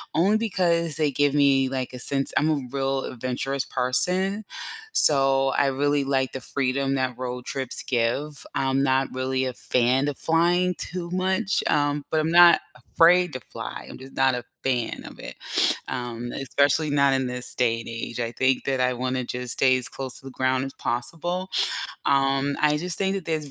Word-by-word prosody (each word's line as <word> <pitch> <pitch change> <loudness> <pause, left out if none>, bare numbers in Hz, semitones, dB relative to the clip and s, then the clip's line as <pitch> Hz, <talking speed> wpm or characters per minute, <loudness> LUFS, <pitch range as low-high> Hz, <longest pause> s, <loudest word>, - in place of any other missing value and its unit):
only 195 +7 +3
because 170 -7 0
they 150 -2 +1
give 145 +1 +2
me 135 -2 +3
like 130 -1 -3
a 125 - -7
sense 135 +1 0
I'm 155 +2 +2
a 150 -3 +1
real 135 -1 -1
adventurous 130 +2 -3
person, 185 +11 0 0.5
so 135 - +4
I 140 +1 +2
really 140 +1 +1
like 135 -1 0
the 130 - -5
freedom 135 +2 -1
that 130 -2 -1
road 125 -1 -5
trips 130 -2 -3
give, 135 +5 -1
I'm 135 0 +1
not 135 -1 +2
really 130 0 -1
a 130 - -3
fan 130 +4 +1
of 145 - -3
flying 175 +2 +2
too 175 -1 -5
much, 185 +1 0
um, 145 -1 +1
but 155 -1 +1
I'm 160 +1 -1
not 175 0 +7 0.3
afraid 175 -1 +5
to 130 - -5
fly, - - -7
I'm - - -9
just 135 +1 -12
not 135 -1 +3
a 125 0 -3 0.2
fan 125 -3 -1
of - - -11
it, - - -8 0.5
um, 120 -1 -5
especially 140 +3 +1
not 140 -1 +3
in 130 -1 0
this 125 0 -4
day 115 -2 +1
and - - -9
age, 115 +1 -5
I 115 -1 -2
think 130 +2 +1
that 135 -2 0
I 125 0 +2
wanna 130 +1 -2
just 125 0 -4
stay 130 -1 +3
as 125 - -4
close 130 -2 -6
to 135 - -18
the 135 - -8
ground 130 +1 0
as 135 - -7
possible, 175 +10 -3 0.6
um, 135 0 +2
I 150 0 +4
just 175 +3 -2
think 195 0 0
that 185 - -5
there's 155 -3 -3
135 Hz, 190 wpm, -24 LUFS, 130-155 Hz, 0.6 s, not